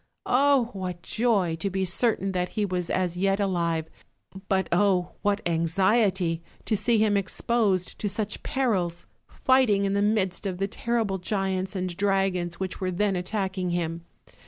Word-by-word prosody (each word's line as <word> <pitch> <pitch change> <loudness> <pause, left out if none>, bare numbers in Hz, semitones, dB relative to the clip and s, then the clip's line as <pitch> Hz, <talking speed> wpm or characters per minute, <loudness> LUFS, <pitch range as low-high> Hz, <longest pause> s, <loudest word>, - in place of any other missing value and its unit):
Oh! 265 -2 +3
what 180 -3 -5
joy, 210 -8 +1
to 200 +4 -2
be 190 0 -1
certain 195 +1 +1
that 180 -1 -1
he 210 - +2
was 180 -3 -2 0.3
yet 195 +2 +1
alive; 170 -5 0 0.6
but 190 -1 +2
oh! 180 -1 +2
what 205 -1 0
anxiety, 180 +1 +2 0.2
to 220 - +1
see 225 +3 +2
him 215 -1 +3
exposed 200 -1 0
to 205 - -1
such 205 +1 -3
perils, 190 -11 -1 0.2
fighting 255 -7 +3
in 195 - 0
the 200 - +1
midst 205 -2 0
of 185 -2 -3
the 195 +1 0
terrible 225 -3 -1
giants 190 0 -2
and 185 -2 -3
dragons 195 -3 0
which 190 0 -4
were 185 - 0
then 195 +2 0
attacking 190 0 -2
him. 170 -1 -2
195 Hz, 155 wpm, -26 LUFS, 180-210 Hz, 0.6 s, Oh